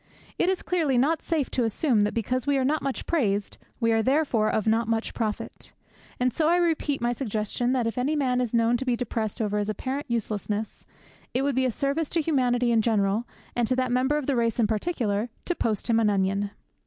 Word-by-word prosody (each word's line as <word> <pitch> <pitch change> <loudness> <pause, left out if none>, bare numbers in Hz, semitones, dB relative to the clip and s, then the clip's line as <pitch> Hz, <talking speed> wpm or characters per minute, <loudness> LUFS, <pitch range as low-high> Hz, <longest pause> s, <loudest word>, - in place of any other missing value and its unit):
It 355 - +3
is 380 - -1
clearly 315 -8 +1
not 295 +6 +2
safe 315 -5 -1
to 250 - +1
assume 225 +1 +2
that 205 - 0
because 250 +4 -1
we 285 -1 +3
are 260 - +1
not 305 +3 +1
much 275 -1 -3
praised, 205 -11 0 0.2
we 230 -1 +2
are 225 0 +3
therefore 260 -4 +2
of 215 - 0
not 225 +1 +2
much 225 0 -1
profit. 215 -3 -4 0.5
And 250 -1 +1
so 310 +3 +1
I 340 - +4
repeat 320 -6 +1
my 240 0 +1
suggestion 230 0 -2
that 250 -3 +1
if 230 +1 -2
any 285 +5 +1
man 255 -4 +1
is 245 -3 -1
known 235 0 +3
to 265 - -4
be 250 -2 +2
depressed 225 -3 -3
over 210 0 0
his 205 0 -2
apparent 265 +7 -3
uselessness, 215 -2 -3 0.5
it 260 - +2
would 280 0 +1
be 260 +1 +1
a 255 - +1
service 280 +6 -1
to 330 - +1
humanity 250 -6 +1
in 225 -1 +4
general, 215 0 +1 0.3
and 240 -2 +1
to 255 - +1
that 255 -1 0
member 260 +4 +2
of 295 - -3
the 275 - +1
race 230 -1 0
in 230 - +4
particular, 220 -2 -1 0.2
to 350 - 0
post 220 - -1
him 230 -1 +3
an 220 -2 +3
onion. 200 0 0
245 Hz, 225 wpm, -26 LUFS, 220-275 Hz, 0.5 s, I